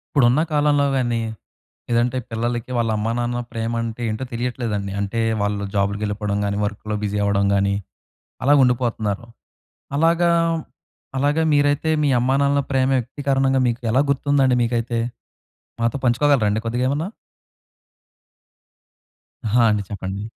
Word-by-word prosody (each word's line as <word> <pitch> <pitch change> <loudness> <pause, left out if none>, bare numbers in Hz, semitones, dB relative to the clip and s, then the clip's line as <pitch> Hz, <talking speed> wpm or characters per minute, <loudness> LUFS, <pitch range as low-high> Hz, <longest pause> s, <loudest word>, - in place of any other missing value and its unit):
ఇప్పుడున్న 130 +2 +4
కాలంలోవేన్నీ, 140 -5 +2 0.7
లేదంటే 120 +1 +1
పిల్లలకి 120 +2 -2
వాళ్ళ 115 -1 +1
అమ్మా, 110 +2 -1
నాన్న 120 0 -1
ప్రేమంటే 115 0 -3
ఏంటో 110 +4 -3
తెలియట్లేదండి. 115 -4 -2
అంటే, 100 +3 -2 0.2
వాళ్ళు 100 0 -1
జాబులుకెళ్ళిపోడం 100 +1 -1
గానీ, 100 0 -1
వర్కులో 105 +1 -4
బిజీ 105 0 -1
అవ్వడం 100 -1 +2
గానీ, 100 0 +2 0.7
అలాగుండిపోతన్నారు. 120 -6 +2 0.7
అలాగా 170 +2 +3 0.9
అలాగా 145 +4 +2
మీరైతే, 145 +2 +2
మీ 145 - +3
అమ్మానాన్నల 140 +3 +2
ప్రేమ 130 -1 +2
వ్యక్తీకరణంగా 135 +1 0
మీకు 120 +1 -2
ఎలా 130 +4 +4
గుర్తుందండి 140 -2 +2
మీకైతే? 115 0 -1 0.8
మాతో 115 +3 +1
పంచుకోగలరండి 120 -4 +3
కొద్దిగేమన్నా? 130 +7 0 2.4
అహా! 115 +3 +3
అండి. 105 -1 0
చెప్పండి. 100 0 -5
120 Hz, 105 wpm, -21 LUFS, 105-135 Hz, 2.4 s, ఇప్పుడున్న